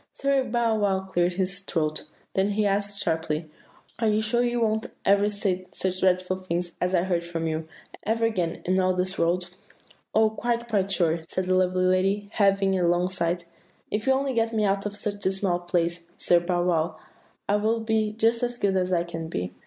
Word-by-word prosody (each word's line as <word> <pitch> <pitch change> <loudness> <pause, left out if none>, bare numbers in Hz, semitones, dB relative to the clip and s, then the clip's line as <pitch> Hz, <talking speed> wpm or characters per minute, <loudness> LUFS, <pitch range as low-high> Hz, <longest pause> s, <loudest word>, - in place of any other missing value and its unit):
"Sir 275 -1 +1
Bow 230 -2 +1
wow 195 -2 +1
cleared 180 -2 0
his 190 +1 -1
throat; 155 -5 -2 0.3
then 195 +2 +1
he 210 +1 +1
asked 200 0 0
sharply, 160 -1 -2 0.5
'Are 225 - +2
you 210 0 +3
sure 225 +2 +1
you 240 0 0
won't 220 0 +1 0.2
ever 200 +1 +4
say 190 -3 -2
such 185 -1 -2
dreadful 185 0 +2
things 175 -1 -3
as 180 +1 +1
I 170 - +3
heard 175 -2 0
from 170 -1 -4
you, 160 0 -2 0.3
ever 225 +1 0
again, 180 -7 -1
in 185 +1 +2
all 185 0 +2
this 185 +1 -1
world?' 175 +1 +1 0.6
"'Oh, 220 0 +4
quite, 235 +1 -2
quite 200 -4 0
sure!' 170 -2 +2
said 185 - -2
the 185 - +1
lovely 185 0 +2
lady, 195 +3 +1
heaving 195 -1 +3
a 175 - +2
long 175 +1 +2
sigh; 175 -2 0 0.5
'if 210 +5 -2
you 265 - +6
will 265 - +1
only 275 -1 -1
get 230 -1 0
me 215 - +2
out 200 0 +1
of 205 - -6
this 205 0 -2
dismal 190 -2 0
place, 170 -1 -1
Sir 175 - +4
Bow 175 0 0
wow, 170 -2 0 0.5
I 205 - +3
will 220 +2 +1
be 220 -1 +1
just 225 +2 +2
as 245 0 -1
good 200 -4 +1
as 185 0 0
I 170 -2 +2
can 165 -1 -6
be. 90 - -4
190 Hz, 205 wpm, -26 LUFS, 175-215 Hz, 0.6 s, you